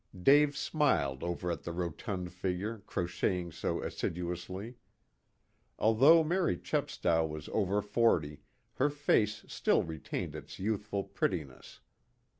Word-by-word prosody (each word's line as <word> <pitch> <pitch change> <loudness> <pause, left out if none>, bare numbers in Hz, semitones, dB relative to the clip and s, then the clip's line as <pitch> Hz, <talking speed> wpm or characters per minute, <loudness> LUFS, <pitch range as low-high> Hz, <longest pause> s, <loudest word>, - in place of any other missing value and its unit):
Dave 145 +7 +5
smiled 135 - +1
over 85 0 -2
at 85 - -4
the 85 - -5
rotund 90 +2 -4
figure 95 +5 -3
crocheting 90 0 -1
so - - -2
assiduously. 90 +5 -4 1.0
Although 135 +10 +6
Mary 170 - +1
Chepstow 80 -1 0
was 75 -2 -5
over 100 0 +1
forty 85 -10 +1 0.4
her 140 +3 +3
face 145 -7 +1
still - - +2
retained 80 -2 -5
its - - -9
youthful 105 0 -2
prettiness. 75 -9 -4
95 Hz, 110 wpm, -32 LUFS, 85-115 Hz, 1.0 s, Although